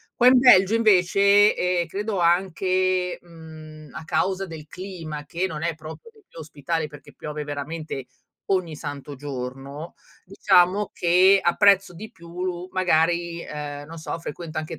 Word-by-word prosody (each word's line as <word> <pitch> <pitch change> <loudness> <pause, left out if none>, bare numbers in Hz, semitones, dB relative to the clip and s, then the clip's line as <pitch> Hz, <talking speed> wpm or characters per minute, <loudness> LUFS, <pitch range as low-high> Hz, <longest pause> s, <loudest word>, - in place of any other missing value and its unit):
Qua 245 - +4
in 255 0 +7
Belgio 225 -5 +6
invece, 200 -1 +4
e 180 -1 0
credo 205 0 -3
anche, 185 +1 +1
mhmm, 155 -3 -13
a 155 - -8
causa 190 +4 -1
del 160 -3 -10
clima 165 -6 -8
che 170 +5 -2
non 155 -3 -6
è 170 -1 -1
proprio 160 - -11
dei 435 -2 -23
più - - -13
ospitali 155 +1 -4
perché 145 -2 -14
piove 150 0 -6
veramente 145 -1 -6 0.4
ogni 185 -5 -1
santo 145 -1 -7
giorno, 135 +3 -7 0.3
diciamo 190 +1 +2
che 185 +3 +4
apprezzo 195 +1 +3
di 215 +6 -10
più 170 +1 -9
lu 180 0 -4
magari 170 -1 +1
ehm, 145 -2 -7
non 165 - -10
so 160 +1 -5
frequento 165 0 -7
anche 155 0 -4
170 Hz, 150 wpm, -23 LUFS, 155-185 Hz, 0.4 s, in